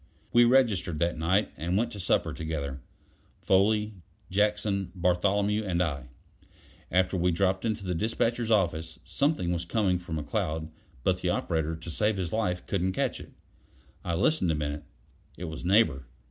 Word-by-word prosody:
We 120 0 +7
registered 110 -10 +3
that 85 +2 0
night 95 +5 +2
and 85 +4 -1
went 115 +3 0
to 105 - -7
supper 90 - +1
together: 70 -4 -4 0.6
Foley, 105 +3 +3 0.4
Jackson, 105 -1 +1
Bartholomew, 100 +4 +1
and 90 -4 -1
I. 70 -8 -1 0.8
Afterward 90 0 +1
we 90 - +4
dropped 95 +3 +1
into 110 -2 -1
the 90 - -1
despatcher's 115 +5 0
office. 80 -6 +1
Something 140 - 0
was 85 -1 -2
coming 90 0 +1
from 85 -3 -5
McCloud, 80 +1 -2 0.3
but 90 -1 +1
the 90 - 0
operator 80 -2 -1
to 80 +1 -8
save 105 +5 +1
his 90 -3 -3
life 90 -5 -1
couldn't 95 -1 0
catch - - -1
it. - - -11 0.7
I 85 - -1
listened 100 - +2
a - - 0
minute; 75 0 -3 0.5
it - - -7
was 80 -1 -6
Neighbor. 90 - +3
90 Hz, 160 wpm, -28 LUFS, 80-105 Hz, 0.8 s, We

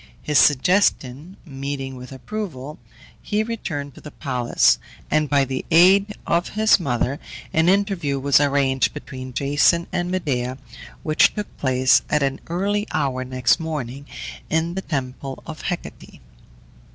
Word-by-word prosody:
His 150 -1 +3
suggestion 150 0 +2
meeting 135 -2 -5
with 125 +1 -10
approval, 150 - -6 0.4
he 210 +1 0
returned 165 - -5
to - - -14
the 150 - -9
palace, 125 -5 +1 0.3
and 155 -1 +2
by 140 -1 +3
the 130 0 -4
aid 190 +5 +5
of 170 +1 0
his 220 -1 +5
mother 135 -2 -1 0.3
an 160 +2 +3
interview 190 -8 +1
was 140 0 +4
arranged 140 -2 +1
between 130 -3 -8
Jason 145 +6 +2
and 175 0 -1
Medea, 130 -9 -2 0.5
which 155 -1 +3
took 210 -1 -6
place, 130 -1 +3
at 150 -1 +2
an 135 0 -1
early 205 +5 -1
hour 130 -3 -1
next 130 +3 +1
morning, 140 -4 -5 0.4
in 160 +2 0
the 190 - -3
temple 135 -4 -5
of 155 -2 -8
Hecate. 180 -1 -6
145 Hz, 140 wpm, -22 LUFS, 130-175 Hz, 0.5 s, aid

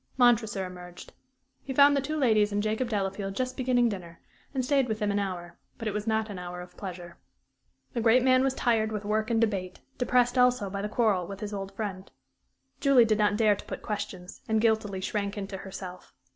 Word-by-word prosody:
Montresor 225 -6 +3
emerged. 180 -1 -10 0.5
He 265 -1 -6
found 285 +1 +7
the 280 - +2
two 305 +3 -3
ladies 215 -7 +3
and 205 0 0
Jacob 220 +3 -1
Delafield 195 -2 -2
just 255 +2 -2
beginning 250 -2 +2
dinner, 180 -6 -6 0.3
and 260 -3 -1
stayed 275 -1 +2
with 220 -2 -2
them 210 -1 0
an 205 - +1
hour; 175 -3 -5 0.2
but 225 - -5
it 210 - -1
was 210 +1 -3
not 220 0 +1
an 200 -4 -7
hour 180 0 -6
of 180 0 -10
pleasure. 175 -3 -8 0.7
The 235 - -1
great 235 +2 +5
man 255 0 +5
was 270 -1 +1
tired 225 -3 +1
with 210 -1 -4
work 215 +2 0
and 230 -1 +2
debate, 195 -5 -1 0.2
depressed 250 0 +2
also 250 -5 +3
by 200 0 -3
the 210 - -3
quarrel 210 -6 +1
with 195 -1 -7
his 210 0 -5
old 195 -1 -5
friend. 195 -3 -5 0.7
Julie 270 -4 +5
did 215 -1 +1
not 210 -1 +3
dare 215 -2 +4
to - - -11
put - - -7
questions, 190 -3 -5
and 220 0 +3
guiltily 215 -4 +1
shrank 200 +1 -2
into 195 -1 -5
herself. 185 -1 -9
210 Hz, 210 wpm, -28 LUFS, 195-240 Hz, 0.7 s, found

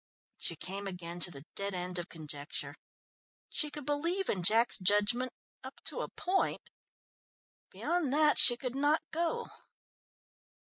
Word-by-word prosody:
She 165 - -1
came 195 +5 -6
again 175 -2 -7
to 175 - +3
the 140 -3 -12
dead 200 -1 0
end 180 0 -3
of 175 - -7
conjecture. 150 -3 -6 0.8
She 300 0 0
could 295 -1 -7
believe 335 +7 -2
in 190 - -1
Jack's 220 +6 +5
judgment 210 +6 +2 0.3
up - - -11
to - - -4
a - - -5
point 380 +2 -3 1.0
beyond 340 -6 -2
that 300 +1 +4
she 240 - +10
could 250 0 -5
not 290 +3 +1
go. 340 +9 -2
225 Hz, 140 wpm, -31 LUFS, 180-295 Hz, 1.0 s, she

